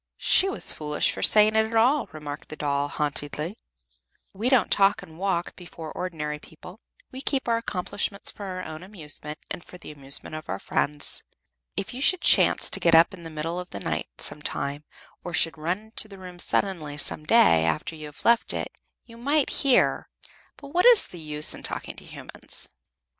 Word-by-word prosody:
"She 385 - +4
was 385 - +4
foolish 150 -1 0
for - - -5
saying 215 0 +5
it 220 - +5
at 225 - -6
all," 250 +5 +3
remarked 150 -1 -8
the - - -6
doll, 145 -1 -1
haughtily. 150 +4 -3 0.8
"We 215 +6 -1
don't 260 -3 +3
talk 195 0 +3
and 160 +1 -14
walk 185 -3 -1
before 170 -3 -9
ordinary 150 -4 -4
people; 180 +7 -14 0.3
we 260 - -7
keep 270 -2 -1
our 230 -1 +2
accomplishments 200 -1 -2
for 205 - -9
our 185 -1 -5
own 155 0 -8
amusement, 155 -5 -7
and 175 - -5
for 180 - -13
the 170 - -10
amusement 140 0 -5
of 155 0 -8
our 95 - -2
friends. 145 +7 +1 0.6
If 195 - -3
you 255 - -6
should 360 +5 +3
chance - - +5
to - - +1
get 170 -1 +4
up 165 +4 +6
in 185 - -10
the 165 - -8
middle 160 +3 -4
of 180 - -7
the 100 - -7
night, - - -3
some - - +2
time, 145 +2 -4 0.4
or 175 -2 -4
should 165 - +2
run 165 +4 -2
into 220 - -3
the 200 -2 -12
room 180 -1 -11
suddenly 165 -7 +1
some 150 - 0
day, 150 - +5
after 80 - -1
you 155 -1 -8
have 150 - -13
left 235 0 +3
it, - - -4 0.3
you 230 -1 -14
might 285 +4 +1
hear 270 -3 +2 0.5
but 280 - -11
what 355 +10 +3
is 480 -4 +8
the 175 - -12
use 150 -1 +1
of - - -10
talking - - -6
to - - -11
human - - -10
beings?" - - +1
175 Hz, 200 wpm, -25 LUFS, 150-215 Hz, 0.8 s, is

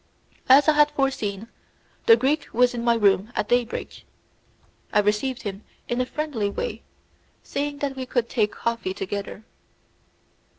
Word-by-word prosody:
As 275 +4 +7
I 310 - +6
had 295 0 +5
forseen, 230 -8 -2 0.6
the 230 - +9
Greek 280 +6 0
was 245 +2 +3
in 235 -1 -4
my 235 -1 +3
room 205 0 +2
at 210 - -1
daybreak. 245 -1 -1 0.9
I - - +1
received 210 +6 0
him 200 -1 -6 0.2
in 240 +1 0
a 250 - -2
friendly 265 -9 -2
way, 480 - -4 0.6
saying 285 0 -3
that 275 -1 -4
we 260 -1 -5
could 245 -2 0
take 215 -4 0
coffee 230 -5 -3
together. 200 +2 -5
240 Hz, 145 wpm, -24 LUFS, 210-270 Hz, 0.9 s, the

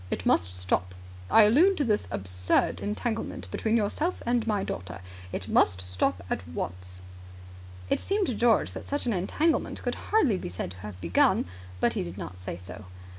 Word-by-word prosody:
It - - -3
must 90 +1 +3
stop. 90 0 -1 0.3
I 225 - +8
allude 325 - +5
to 290 - +2
this 215 -5 +1
absurd 90 -1 0
entanglement 225 +2 -3
between 225 +1 +1
yourself 300 - -1
and 235 -1 +1
my 205 -3 +1
daughter. 90 0 -5 0.3
It - - -4
must 90 +1 +3
stop 90 0 -1
at 90 - -3
once." 90 +2 -3 0.8
It - - +1
seemed 400 0 0
to 255 - -1
George 230 0 +3
that - - -8
such 285 -1 -1
an 235 - +1
entanglement 300 - 0
could - - 0 0.2
hardly 280 - +3
be - - -5
said 90 0 -5
to 95 - -9
have 95 -1 -8
begun, 85 0 +3 0.3
but - - +2
he - - -1
did 85 +1 -6
not 90 -1 -7
say 90 -2 -5
so. 95 +3 -10
105 Hz, 180 wpm, -28 LUFS, -, 0.8 s, I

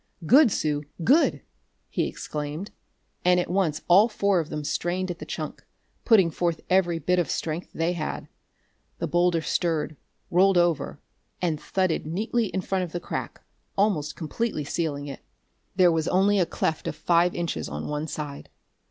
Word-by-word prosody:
"Good, 265 - +6
Sue, 150 -4 0 0.2
good!" 290 - +3 0.4
he - - -1
exclaimed, 150 +6 -5 0.5
and 180 0 +4
at 175 - -2
once 170 -5 0
all 200 +6 +6
four 200 -3 +2
of 160 - -3
them 150 - -4
strained 180 +5 -1
at 175 - -7
the - - -8
chunk, - - -5 0.4
putting 195 -8 +5
forth 170 +1 -1
every 180 -3 +3
bit 180 +3 +1
of 175 - 0
strength 165 +2 -3
they 165 +2 0
had. 160 -3 -4 0.7
The - - -2
boulder 175 -1 +2
stirred, 160 -3 -1 0.4
rolled 190 +1 +5
over, 175 -3 +1 0.4
and 165 -4 -1
thudded 185 -5 0
neatly 220 +7 0
in 190 0 -2
front 190 0 -1
of 170 - -6
the 175 - -2
crack, - - -5 0.4
almost 195 -8 +1
completely 170 +1 -2
sealing 145 -1 -2
it. 140 -2 -7 0.6
There 180 -2 +5
was 160 0 0
only 195 +2 +3
a 175 - +2
cleft 160 - -2
of - - -3
five 170 +2 +2
inches 170 -1 -3
on 75 +1 -5
one 150 +1 -3
side. 145 -2 -6
175 Hz, 165 wpm, -26 LUFS, 155-190 Hz, 0.7 s, Good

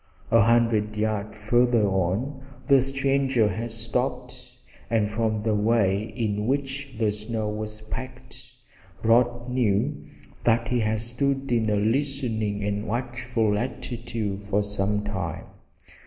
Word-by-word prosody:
A 115 - +6
hundred 110 -1 +3
yards 110 0 -1
farther 120 0 +3
on 100 +9 -1 0.2
the 135 -1 +6
stranger 135 -3 +2
had 110 +5 -3
stopped, 115 0 -3 0.4
and 110 -2 +1
from 110 -1 0
the 110 0 +1
way 105 -2 +2
in 105 -2 -1
which 135 0 -2
the 110 -2 +2
snow 110 +1 -3
was 105 0 -5
packed 125 +2 -8 0.5
Rod 120 +1 +3
knew 120 -6 +1 0.4
that 115 0 +2
he 125 - +2
had 110 -1 0
stood 135 +3 0
in 115 -2 +2
a 105 - +2
listening 110 -2 0
and 105 +1 -2
watchful 120 -2 -1
attitude 115 -4 -3
for 105 +1 +1
some 105 0 -1
time. 105 -1 -4
115 Hz, 125 wpm, -25 LUFS, 105-125 Hz, 0.5 s, A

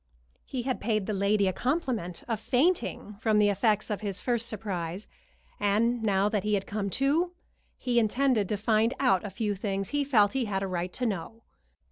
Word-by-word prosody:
He 255 -3 -4
had 260 0 -2
paid 215 -2 0
the 215 - -2
lady 200 +1 +2
the 185 - +1
compliment 245 - -2
of 225 -3 -1
fainting 250 - 0
from 220 -2 +2
the 210 -1 +5
effects 210 +1 +1
of 210 - -2
his 200 -3 -3
first 235 -2 0
surprise, 190 -3 -4 0.5
and 225 +4 +2
now 200 -2 +2
that 210 -2 0
he 210 0 +1
had 195 - -2
come 200 -1 -3
to 315 +7 +1 0.4
he 245 -2 +1
intended 235 -2 +2
to 210 - 0
find 220 +3 +2
out 250 -9 +3
a 205 - -4
few 205 +2 -2
things 195 -1 -3
he 290 0 0
felt 225 -7 +3
he 265 -2 0
had 195 -2 -2
a - - -1
right 180 -1 -3
to 250 - -2
know. 225 +2 -4
215 Hz, 195 wpm, -28 LUFS, 200-240 Hz, 0.5 s, the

